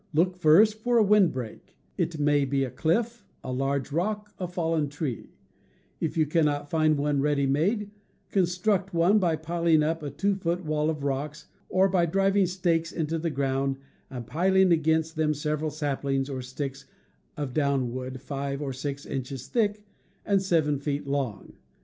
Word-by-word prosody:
Look 180 +3 +3
first 185 +6 +5
for 240 +2 +1
a 225 - +6
wind 200 -4 +5
break 125 -4 -8
— - - -39
it 165 - -1
may 145 -1 +3
be 135 0 0
a 130 - -3
cliff, 230 +9 0 0.2
a 130 - -4
large 135 +1 -1
rock, 210 +6 -2
a 180 - -2
fallen 165 -4 -1
tree; 140 -5 -5 0.6
if 160 - -2
you 155 - +4
cannot 145 -2 0
find 155 -2 +3
one 145 -1 +1
ready 145 -1 +1
made, 200 - 0 0.4
construct 185 +1 +1
one 180 +6 +4
by 170 -4 +2
piling 165 0 +2
up 160 +1 -1
a 145 - -4
two 200 +9 0
foot 180 -2 -2
wall 155 0 0
of 150 -3 -3
rocks, 145 +3 -3 0.2
or 190 +1 +4
by 180 -3 +2
driving 195 +2 +2
stakes 170 -2 0
into 160 0 -2
the 165 +1 -1
ground 135 -1 -1 0.3
and 125 -3 -6
piling 190 +6 +3
against 160 0 +2
them 155 -1 +1
several 150 +1 -1
saplings 140 -2 -2
or 130 -1 -4
sticks 135 +2 -6 0.5
of 145 -4 -4
downwood 130 -3 -1
five 140 0 -4
or 140 -2 -3
six 140 +2 -5
inches 130 -1 -5
thick 210 -3 0 0.4
and 200 -2 +2
seven 160 -6 +1
feet 140 0 -3
long. 140 -6 -3
155 Hz, 170 wpm, -27 LUFS, 140-180 Hz, 0.6 s, a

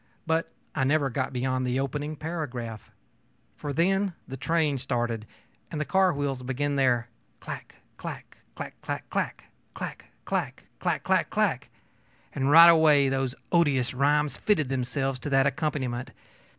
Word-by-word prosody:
But 160 +1 0 0.2
I 140 - 0
never 140 0 +2
got 130 +2 -1
beyond 130 0 -1
the 125 +1 0
opening 145 +3 -2
paragraph; 130 - -5 0.7
for 145 - -5
then 190 +5 +2
the 135 - -6
train 150 0 +1
started 120 -4 -2 0.4
and 155 - -4
the 150 - -1
car 190 +1 +3
wheels 140 -4 -2
began 135 +3 -1
their 125 -3 +2 0.3
'clack, - - -8 0.2
clack - - -8 0.2
clack - - -8
clack - - -4
clack! - - -2 0.3
clack - - -6 0.2
clack! - - -2 0.2
clack - - -1
clack - - +2
clack!' - - 0 0.6
and 135 0 0
right 165 +3 +10
away 155 -4 +6
those 135 -1 -1 0.2
odious 140 -8 +3
rhymes 145 +2 +2
fitted 165 -11 +1
themselves 135 0 -1
to 145 - -4
that 135 -1 +4
accompaniment. 140 -4 -1
140 Hz, 145 wpm, -27 LUFS, 130-155 Hz, 0.7 s, right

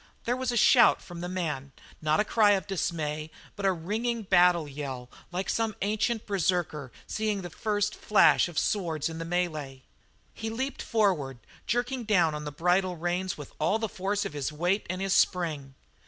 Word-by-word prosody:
There 245 - +1
was 255 -1 -1
a 240 - -1
shout 240 +2 +6
from 175 -1 -9
the 175 - -4
man, 150 -7 -3 0.3
not 155 +2 +2
a 210 - +3
cry 210 -1 +4
of 190 -2 0
dismay, 155 -5 -2 0.3
but 200 -1 -1
a - - +4
ringing 220 +7 -2
battle 175 -4 +4
yell 135 -3 -6 0.2
like 185 +2 -3
some 225 -2 0
ancient 215 +2 0
berserker 175 - -1
seeing 215 -3 -2
the 175 - -7
first 210 +3 -1
flash 210 - +4
of 175 -3 -10
swords 165 -7 0
in 165 0 -7
the 165 - -4
mêlée. 155 -6 -2 0.5
He 225 - -5
leaped 260 +5 -3
forward, 180 - +1 0.3
jerking 245 +2 -1
down 180 -7 +3
on 150 0 -5
the 150 - -4
bridle 180 +4 +1
reins 175 +2 -2
with 145 -2 -10
all 175 +8 +2
the 225 0 -2
force 200 +1 -2
of 180 - -5
his 145 0 -3
weight 175 +7 0
and 185 +2 -2
his 195 - +1
spring. 150 -7 +1
180 Hz, 185 wpm, -28 LUFS, 155-210 Hz, 0.5 s, shout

